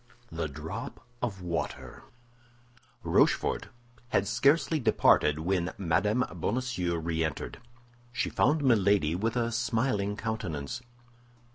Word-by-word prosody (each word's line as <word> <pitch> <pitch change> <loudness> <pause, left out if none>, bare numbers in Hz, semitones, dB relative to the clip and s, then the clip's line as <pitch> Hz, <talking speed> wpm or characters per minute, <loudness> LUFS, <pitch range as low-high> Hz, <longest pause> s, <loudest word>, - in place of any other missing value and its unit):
THE 80 -1 -2
DROP 75 +3 -6 0.2
OF 100 -7 -3
WATER 85 -1 -4 1.0
Rochefort - - +2 0.4
had 100 -3 +1
scarcely 140 +7 +3
departed 90 - +4
when 90 +2 -1
Mme. 100 +7 +1 0.2
Bonacieux 100 -5 -1
re 80 0 -1
entered. 80 -4 -4 0.5
She 125 - -2
found 150 +2 +2
Milady 100 - +3
with 110 +6 -1
a 120 -1 0
smiling 115 -3 0
countenance. 110 -4 -4
100 Hz, 105 wpm, -29 LUFS, 85-120 Hz, 1.0 s, departed